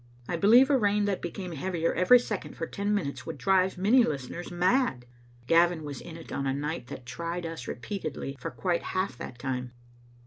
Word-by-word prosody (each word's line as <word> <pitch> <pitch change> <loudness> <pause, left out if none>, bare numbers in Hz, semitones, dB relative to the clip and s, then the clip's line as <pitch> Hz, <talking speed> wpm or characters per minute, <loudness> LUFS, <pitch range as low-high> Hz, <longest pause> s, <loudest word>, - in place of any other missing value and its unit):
I 175 - -1
believe 235 - +6
a 275 - +5
rain 205 -1 +2
that 200 -2 -1
became 180 +1 -5
heavier 165 +1 -1
every 185 +8 +7
second 215 -5 -4
for 165 - -2
ten 200 +4 -2
minutes 140 -9 -3
would 165 - -5
drive 190 -1 +2
many 220 +7 +5
listeners 150 - -4
mad, 180 - +1 0.4
Gavin 170 +2 +4
was 145 -3 -6
in 165 -1 -9
it 165 - -11
on 140 - -2
a 135 - 0
night 150 -2 -3
that 130 -2 -8
tried 170 +6 -4
us 165 -6 -6
repeatedly 155 - -5
for - - -4
quite 175 -2 -1
half 185 -8 -2
that 120 - -7
time. 125 -1 -4
170 Hz, 195 wpm, -28 LUFS, 140-195 Hz, 0.4 s, every